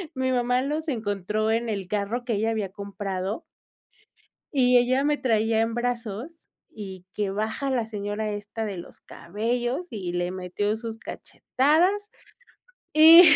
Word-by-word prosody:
mi 260 0 0
mamá 250 0 +2
los 300 +4 -2
encontró 215 -2 -1
en 230 +1 0
el 195 -4 -3
carro 210 +4 -2
que 240 - 0
ella 220 +2 +1
había 215 -3 -1
comprado. 200 - -4 1.1
Y 250 -3 +5
ella 255 +3 +2
me 295 0 +3
traía 225 -3 +2
en 225 0 -1
brazos 240 - -4 0.2
y 190 -4 -9
que 205 -2 -1
baja 220 +7 -2
a - - 0
la 240 -4 0
señora 210 0 -3
esta 205 +2 -4
de 200 -3 -4
los 170 - -11
cabellos 240 - -2
y 185 -5 -4
le 175 0 -1
metió 185 +3 -2
sus 225 0 -6
cachetadas 360 - +1 0.8
y 320 +3 +11
225 Hz, 150 wpm, -26 LUFS, 205-255 Hz, 1.1 s, y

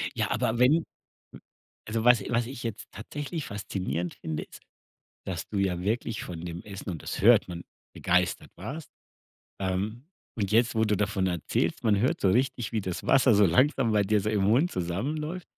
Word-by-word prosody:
Ja - - -1
aber 115 +2 0
wenn 150 +7 +5 0.5
w - - -11 0.5
also, 110 +1 -1
was 125 -2 +6
was 115 -1 +1
ich 125 -1 -8
jetzt 115 -2 -5
tatsächlich 145 - -5
faszinierend 90 -5 -4
finde 80 - -4
ist, - - -14 0.6
dass 85 -4 -4
du 105 - -3
ja 95 -3 0
wirklich 110 +2 -2
von 85 -2 -7
dem 85 0 -6
Essen, 100 -2 -8
und 80 - -6
das - - -4
hört 115 +1 +6
man, 85 -1 -7 0.3
begeistert 90 0 0
warst. 135 - -7 0.7
Ähm. 100 +8 -2 0.3
Und 100 -4 -1
jetzt, 115 +2 +3
wo 110 0 +3
du 105 -1 +1
davon 100 -1 0
erzählst, 90 - -1
man 105 -3 +3
hört 125 - +1
so 95 - +4
richtig, 125 0 0
wie 110 - 0
das 95 -2 -5
Wasser 130 -4 +5
so 105 - +5
langsam 125 - +3
bei 105 -1 +4
dir 105 +2 +2
so 105 +2 -1
im 105 -2 +1
Mund 125 - +3
zusammenläuft. 150 - -3
105 Hz, 185 wpm, -28 LUFS, 95-120 Hz, 0.7 s, was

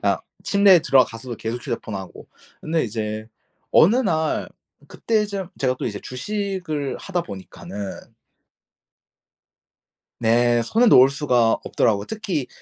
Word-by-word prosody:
그냥 - - +1 0.2
침대에 200 -3 +5
들어가서도 125 -3 +1
계속 115 +3 -4
휴대폰 115 -4 -4
하고. 95 -1 -8 0.3
근데 160 +1 0
이제 110 -1 -4 0.4
어느 205 +9 +5
날 160 -11 0 0.4
그때쯤 205 -5 -1
제가 130 -1 0
또 - - -3
이제 105 -4 -4
주식을 180 -1 -4
하다 180 -3 -3
보니까는 100 - -9 2.1
네 120 +1 +3
손을 230 - +3
놓을 130 -7 +7
수가 125 -5 +2
없더라고요. 100 -3 +1
특히 190 - -3
130 Hz, 260 characters per minute, -22 LUFS, 115-190 Hz, 2.1 s, 놓을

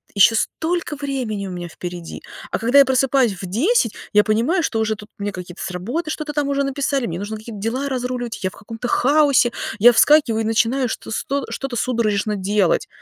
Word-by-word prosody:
ещё 205 +3 +6
столько 325 +6 -1
времени 260 -8 -3
у - - -6
меня 175 -1 -5
впереди. 175 0 -7 0.3
А - - 0
когда 240 +5 +4
я - - +9
просыпаюсь 260 -3 +2
в 190 - -5
10, 235 - +1 0.2
я 210 0 +5
понимаю, 235 - +1
что 230 -8 -1
уже 220 0 0
тут 210 0 -12
мне 205 0 -2
какие-то 180 -1 -9
с - - -3
работы 240 - -3
что-то 305 -1 -4
там 290 -1 0
уже 280 0 +1
написали, 275 -1 -1
мне 170 -3 -4
нужно 210 +2 -5
какие-то 215 -1 -9
дела 250 +6 -2
разруливать, 250 -4 -3
я 185 - +1
в - - -18
каком-то 225 +4 -7
хаосе, 280 -2 +3 0.3
я 240 +3 +7
вскакиваю 240 -3 +4
и - - -2
начинаю 235 +3 +1
что - - -6
с - - -2
то 280 -2 -2
что-то 270 -2 -4
судорожно 215 -4 0
делать. 200 -1 +1
235 Hz, 205 wpm, -20 LUFS, 210-275 Hz, 0.3 s, я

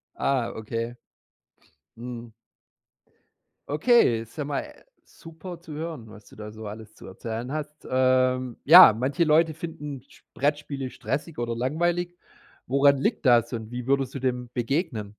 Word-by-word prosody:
Ah, 130 -4 0
okay. 115 +2 -4 1.0
Mhm. 120 -1 -8 1.4
Okay. 150 - +3
Ist 115 +7 -14
ja 150 - -2
mal, 145 -1 -2
äh, - - -15 0.2
super 165 +1 -11
zu 165 -3 -11
hören, 155 -8 -6
was 105 -1 -14
du - - -16
da 105 0 -8
so 110 0 -10
alles 110 +1 -10
zu - - -14
erzählen 115 +6 -6
hast. 150 0 -6
Ähm, 130 -1 +2
ja, 160 - +10
manche 135 +7 0
Leute 160 +1 +3
finden 150 -4 -7
Sp - - -21
Brettspiele 145 -2 -2
stressig 145 +5 -4
oder 120 -1 -2
langweilig. 175 +7 -1 0.5
Woran 140 +2 +4
liegt 135 - -1
das 120 -1 +4
und 115 -1 -6
wie 125 0 -6
würdest 135 -2 +1
du - - -3
dem 125 -2 -2
begegnen? 120 - -2
130 Hz, 150 wpm, -25 LUFS, 115-150 Hz, 1.4 s, ja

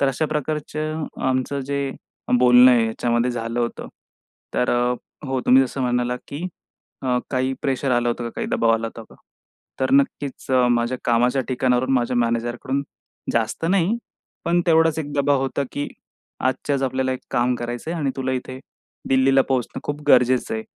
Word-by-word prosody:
तर 140 - +3
अशा 145 +4 0
प्रकारचं 155 +1 -3 0.2
आमचं 130 +2 -1
जे 140 0 -2 0.5
बोलणं 125 0 +7
आहे 120 -2 +4
ह्याच्यामध्ये 120 +2 0
झालं 115 0 -3
होतं. 120 - -3 0.7
तर 125 - +1
अ, 120 0 +2 0.3
हो 130 -1 -1
तुम्ही 130 +1 +7
जसं 135 +1 -4
म्हणालात, 125 0 0
की 145 +5 -5 0.6
अ, 125 -1 +1
काही 130 0 0
प्रेशर 135 0 0
आलं 120 0 +2
होतं 120 0 -2
का? 115 - -4
काही - - -2
दबाव 115 0 +2
आला 115 0 -2
होता 115 0 -10
का? - - -15 0.7
तर 130 - +1
नक्कीच 140 0 +1 0.2
माझ्या 120 +1 +1
कामाच्या 125 +3 +2
ठिकाणावरून 130 0 +1
माझ्या 125 -1 +1
मॅनेजरकडून 120 +3 -1 0.5
जास्त 115 +7 -1
नाही. 195 +4 +2 0.5
पण 175 +1 +2
तेवढाच 160 -1 +4
एक 145 -2 -4
दबाव 140 -1 +2
होता, 135 +1 -1
की 145 - -3 0.6
आजच्याच 135 +2 0
आपल्याला 130 0 0
एक 130 - -4
काम 125 +1 +2
करायचंय 120 +8 -4
आणि 145 -5 -1
तुला 130 -1 -1
इथे 130 0 -4 0.5
दिल्लीला 135 0 +4
पोहोचणं 130 -3 -1
खूप 145 0 -3
गरजेचं 125 -2 +4
आहे. 110 - -3
130 Hz, 160 wpm, -22 LUFS, 120-140 Hz, 0.7 s, बोलणं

